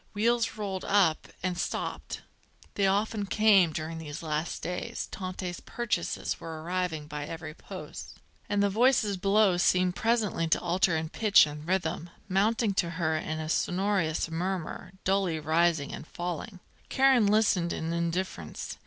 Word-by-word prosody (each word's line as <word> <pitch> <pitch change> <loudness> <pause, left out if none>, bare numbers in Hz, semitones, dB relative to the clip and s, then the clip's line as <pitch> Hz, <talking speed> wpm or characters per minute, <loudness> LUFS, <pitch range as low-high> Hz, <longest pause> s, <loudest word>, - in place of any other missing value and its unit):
Wheels 225 +1 +1
rolled 195 -3 -3
up 195 -6 +2 0.2
and 185 -1 0
stopped. - - -4 0.5
They 200 -1 +2
often 205 +1 0
came, 200 -5 +5
during 160 +1 -4
these 150 0 -7
last 155 +1 -3
days; 180 +1 -4
Tante's 185 -2 -5
purchases 220 -8 -2
were 160 -1 -7
arriving 175 -3 -2
by 150 -1 -5
every 160 -2 -6
post. - - -9 0.3
And 205 0 +2
the 200 - +3
voices 225 -2 +3
below 195 0 +3
seemed 180 0 +3
presently 220 -7 +1
to 160 - +2
alter 175 -1 +2
in 160 0 -3
pitch 210 0 +5
and 150 +1 -8
rhythm, 175 -2 -1 0.2
mounting 205 +3 +2
to 170 - -5
her 160 -3 +1
in 155 0 -3
a 155 - -4
sonorous 180 -1 0
murmur, 180 +1 -3
dully 190 -4 +1
rising 160 -1 +1
and - - -8
falling. 180 +2 -5 0.3
Karen 265 -5 +4
listened 205 -5 +3
in 165 +1 -3
indifference. 170 - -3
180 Hz, 145 wpm, -29 LUFS, 160-200 Hz, 0.5 s, came